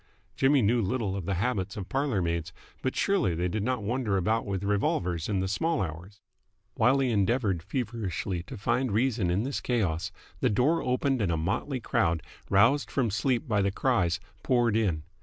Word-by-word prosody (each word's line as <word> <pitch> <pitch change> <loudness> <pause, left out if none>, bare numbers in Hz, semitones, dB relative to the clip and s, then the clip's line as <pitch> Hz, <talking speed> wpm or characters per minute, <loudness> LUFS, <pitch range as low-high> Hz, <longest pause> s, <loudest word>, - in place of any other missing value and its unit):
Jimmy 135 -1 +4
knew 115 +3 +3
little 105 -1 -1
of 95 -3 -5
the 100 - 0
habits 100 -1 -1
of 95 -3 -5
parlour 135 -8 0
maids, 85 0 -2 0.3
but 130 - -1
surely 195 - +1
they 90 +2 0
did 105 +4 -2
not 125 0 -1
wander 110 -2 0
about 110 +5 0
with 100 -1 -2
revolvers 90 -4 0
in 100 -3 +1
the 95 - -1
small 160 - 0
hours? 90 +4 -5 0.5
While 125 +6 +3
he 135 -2 +1
endeavoured 100 -3 +1
feverishly 100 -4 -3
to 130 - -7
find 125 +4 0
reason 115 -4 +1
in 95 +5 +1
this 135 +2 -3
chaos, 95 -10 -1 0.3
the - - +2
door 135 +11 +2
opened 130 0 0
and 95 -5 +1
a 80 - 0
motley 110 - -1
crowd, 85 -7 0 0.3
roused 115 +9 +4
from 120 -6 0
sleep 120 +7 0
by 105 -4 +2
the 100 - +2
cries, 90 -7 +1 0.2
poured 120 -4 +2
in. 95 -9 +1
105 Hz, 185 wpm, -28 LUFS, 95-125 Hz, 0.5 s, Jimmy